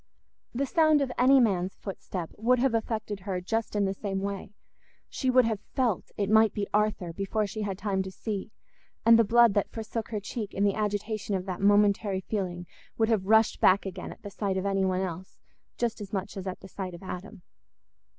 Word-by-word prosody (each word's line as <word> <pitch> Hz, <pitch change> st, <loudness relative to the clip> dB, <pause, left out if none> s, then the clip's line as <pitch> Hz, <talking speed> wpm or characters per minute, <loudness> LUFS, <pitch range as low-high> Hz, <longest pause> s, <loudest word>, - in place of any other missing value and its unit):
The 270 Hz, +4 st, -1 dB
sound 310 Hz, +1 st, +4 dB
of 260 Hz, -, -3 dB
any 265 Hz, +2 st, +6 dB
man's 195 Hz, -6 st, +1 dB
footstep 185 Hz, -3 st, -6 dB
would 245 Hz, +4 st, +2 dB
have 255 Hz, 0 st, +2 dB
affected 220 Hz, -2 st, -2 dB
her 185 Hz, -1 st, -3 dB
just 225 Hz, +5 st, -2 dB
in 205 Hz, -1 st, +2 dB
the 195 Hz, -, 0 dB
same 195 Hz, -1 st, -3 dB
way—she 200 Hz, +6 st, -6 dB
would 255 Hz, -1 st, +5 dB
have 220 Hz, -3 st, -1 dB, 0.2 s
felt 245 Hz, -8 st, 0 dB
it 200 Hz, -, 0 dB
might 220 Hz, 0 st, +4 dB
be 205 Hz, -, -1 dB
Arthur 210 Hz, -5 st, 0 dB
before 200 Hz, +4 st, -1 dB
she 215 Hz, +2 st, -5 dB
had 200 Hz, -3 st, -3 dB
time 195 Hz, -1 st, -1 dB
to 190 Hz, -, -4 dB
see, 200 Hz, +1 st, -5 dB, 0.6 s
and 230 Hz, 0 st, +8 dB
the -, -, +6 dB
blood 235 Hz, 0 st, +5 dB
that 205 Hz, -, +1 dB
forsook 225 Hz, 0 st, -5 dB
her 215 Hz, -2 st, -2 dB
cheek 205 Hz, +1 st, -6 dB
in 200 Hz, -, +1 dB
the 200 Hz, -1 st, +3 dB
agitation 210 Hz, 0 st, -2 dB
of 185 Hz, -1 st, -3 dB
that 185 Hz, -1 st, -5 dB
momentary 205 Hz, -1 st, +3 dB
feeling 180 Hz, -3 st, -3 dB, 0.3 s
would 225 Hz, 0 st, +2 dB
have 205 Hz, -4 st, +1 dB
rushed 220 Hz, +1 st, +4 dB
back 190 Hz, +2 st, +5 dB
again 190 Hz, -, -6 dB
at -, -, -13 dB
the 205 Hz, -, -7 dB
sight 195 Hz, -1 st, -2 dB
of 190 Hz, -, -2 dB
any 195 Hz, -1 st, +1 dB
one 185 Hz, 0 st, 0 dB
else 185 Hz, 0 st, -6 dB, 0.4 s
just 235 Hz, -3 st, -1 dB
as 200 Hz, -1 st, -7 dB
much 200 Hz, 0 st, -3 dB
as 195 Hz, -1 st, -6 dB
at 185 Hz, -, -5 dB
the -, -, -10 dB
sight 185 Hz, -2 st, -6 dB
of 170 Hz, -, -12 dB
Adam. 190 Hz, +1 st, -8 dB
205 Hz, 210 wpm, -28 LUFS, 190-220 Hz, 0.6 s, and